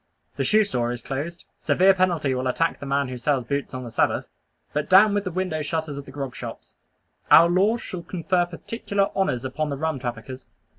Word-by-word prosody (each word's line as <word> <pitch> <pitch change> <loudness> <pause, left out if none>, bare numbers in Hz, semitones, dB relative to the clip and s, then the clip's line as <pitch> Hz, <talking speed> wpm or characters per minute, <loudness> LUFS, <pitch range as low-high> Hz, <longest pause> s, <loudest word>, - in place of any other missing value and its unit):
The - - -1
shoe 215 0 +4
store 120 - -1
is 120 -1 -6
closed; 155 +6 -5
severe 190 +2 +4
penalty 175 -7 +1
will 130 0 -2
attack 165 +6 0
the 140 - -7
man 140 -1 0
who 125 -1 -6
sells 135 0 +1
boots 140 +2 -3
on 130 - -5
the 120 - -8
Sabbath. - - +1 0.5
But 150 0 -2
down 200 +3 +7
with 205 0 0
the - - -1
window 180 -3 -2
shutters 155 -1 -3
of 140 0 -7
the 135 - -11
grog 135 -3 -5
shops. - - -8 0.6
Our 170 - +8
laws 200 +7 +2
shall 180 - -6
confer 175 0 0
particular 200 +3 -2
honors 135 -11 0
upon 150 +4 -2
the 140 - -3
rum 160 -1 -2
traffickers. 120 +1 -6
155 Hz, 205 wpm, -24 LUFS, 130-185 Hz, 0.6 s, Our